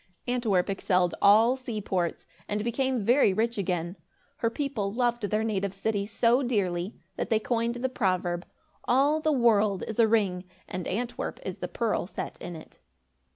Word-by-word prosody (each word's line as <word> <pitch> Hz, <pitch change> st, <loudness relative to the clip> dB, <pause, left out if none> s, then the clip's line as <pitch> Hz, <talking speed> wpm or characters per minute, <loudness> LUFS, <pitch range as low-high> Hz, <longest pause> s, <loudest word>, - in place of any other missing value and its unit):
Antwerp 230 Hz, -7 st, +1 dB
excelled 185 Hz, -3 st, +1 dB
all 220 Hz, +5 st, +6 dB
seaports 210 Hz, -9 st, -3 dB, 0.2 s
and 210 Hz, 0 st, -1 dB
became 245 Hz, -1 st, 0 dB
very 240 Hz, -3 st, +4 dB
rich 225 Hz, +2 st, 0 dB
again. 175 Hz, -1 st, -2 dB, 0.4 s
Her 230 Hz, -, +1 dB
people 230 Hz, -6 st, -2 dB
loved 240 Hz, +1 st, 0 dB
their 215 Hz, +1 st, +1 dB
native 200 Hz, -3 st, -1 dB
city 200 Hz, 0 st, -1 dB
so 235 Hz, +4 st, +3 dB
dearly, 195 Hz, -6 st, -1 dB, 0.2 s
that -, -, -2 dB
they 225 Hz, -, +4 dB
coined 235 Hz, +1 st, -1 dB
the 245 Hz, +2 st, -1 dB
proverb 185 Hz, -7 st, -1 dB, 0.4 s
"All 280 Hz, +5 st, +3 dB
the 310 Hz, 0 st, +2 dB
world 215 Hz, -7 st, +3 dB
is 220 Hz, +1 st, -5 dB
a 230 Hz, -, +6 dB
ring, 195 Hz, -5 st, +1 dB, 0.2 s
and 180 Hz, -1 st, -5 dB
Antwerp 235 Hz, +5 st, -3 dB
is -, -, -5 dB
the -, -, -3 dB
pearl -, -, -1 dB
set -, -, -6 dB
in 175 Hz, -, -6 dB
it." 160 Hz, -, -13 dB
215 Hz, 160 wpm, -28 LUFS, 190-240 Hz, 0.4 s, all